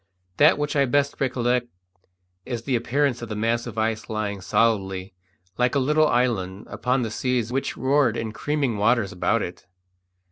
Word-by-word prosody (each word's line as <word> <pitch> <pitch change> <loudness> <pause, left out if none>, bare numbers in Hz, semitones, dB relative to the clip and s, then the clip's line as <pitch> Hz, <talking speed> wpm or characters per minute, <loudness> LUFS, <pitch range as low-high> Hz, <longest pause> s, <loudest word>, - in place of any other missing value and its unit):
That 150 - +6
which 150 0 -2
I 140 -1 +4
best 140 +2 0
recollect 125 -2 +1 0.8
is 120 0 -5
the 130 -1 0
appearance 125 +2 0
of 120 - -6
the 105 - -4
mass 115 +2 0
of - - -8
ice 110 0 -1
lying 105 -3 -3
solidly, 95 -3 0 0.5
like 125 +2 +2
a - - +4
little 150 +3 +3
island, 100 -8 0
upon 125 +1 0
the 110 - -3
seas 120 +1 -1
which 135 +1 -2
roared 130 -3 +2
in 110 -1 -3
creaming 140 -3 -1
waters 110 -1 +2
about 90 - 0
it. - - -8
120 Hz, 170 wpm, -24 LUFS, 110-135 Hz, 0.8 s, That